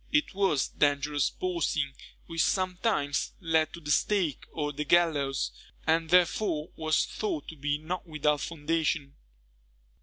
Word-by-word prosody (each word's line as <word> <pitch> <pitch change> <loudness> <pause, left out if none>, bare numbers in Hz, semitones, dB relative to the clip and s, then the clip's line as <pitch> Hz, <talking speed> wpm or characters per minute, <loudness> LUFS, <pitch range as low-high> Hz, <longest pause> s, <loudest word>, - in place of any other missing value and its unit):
It 300 0 +2
was 190 -9 +1
dangerous 145 0 +1
boasting, 165 -6 -1 0.3
which 165 -1 -1
sometimes 185 -6 0
led 160 -3 +2
to 170 - -7
the 150 -2 -4
stake 175 -3 +1
or 150 -2 -2
the 150 - -2
gallows, 145 -4 +2 0.3
and 160 0 +2
therefore 175 -2 +2
was 155 -1 +1
thought 360 -8 -3
to 160 - -9
be 145 0 -1
not 175 +4 -5
without 150 -2 +1
foundation. 160 -3 -1
160 Hz, 130 wpm, -29 LUFS, 145-175 Hz, 0.3 s, It